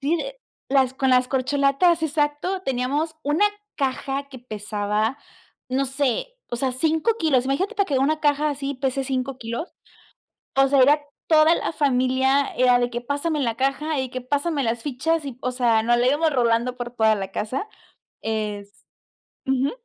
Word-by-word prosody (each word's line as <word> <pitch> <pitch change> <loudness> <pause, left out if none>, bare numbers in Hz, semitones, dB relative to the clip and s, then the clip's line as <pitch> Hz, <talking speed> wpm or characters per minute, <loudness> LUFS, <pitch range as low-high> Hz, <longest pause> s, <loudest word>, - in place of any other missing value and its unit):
Sí, 295 +5 +1
de - - -6 0.3
las 265 -1 +2
con 265 0 +1
las 250 0 +4
corcholatas, 280 +5 +2
exacto. 310 +5 -1
Teníamos 275 +4 -1
una 295 +8 +2 0.3
caja 275 0 -2
que 265 - -10
pesaba, 215 +1 -2 0.5
no 265 +2 0
sé, 270 - -1 0.2
o 240 - -2
sea, 260 +1 -1
5 320 - +1
kilos, 275 -7 +2
imagínate 275 +9 -1
para 400 -1 +1
que 275 -6 +1
una 305 +4 +1
caja 295 0 +2
así, 280 0 -4
pese 265 0 -1
5 260 0 -3
kilos, 235 +8 -5 0.8
o 270 0 +5
sea, 275 -1 +4
era 295 +3 +5 0.3
toda 315 +1 +5
la - - -2
familia, 265 0 +2
era 250 -1 +4
de 245 0 0
que 240 0 -4
pásame 285 +5 -2
la 235 -5 0
caja 275 +3 -1
y 260 -1 -2
que 255 0 -5
pásame 285 +3 -1
las 230 0 -1
fichas 295 +3 -1
y, 260 -3 -6
o 255 - -1
sea, 235 -3 +2
nos 240 +1 +3
la 245 +1 +2
íbamos 300 +4 +2
rolando 240 0 +1
por 240 -1 -5
toda 220 -2 +3
la 195 -1 -5
casa. 255 - -3 0.5
Es 205 -2 -4 0.6
ujú. 265 +1 +1
270 Hz, 170 wpm, -23 LUFS, 245-295 Hz, 0.8 s, o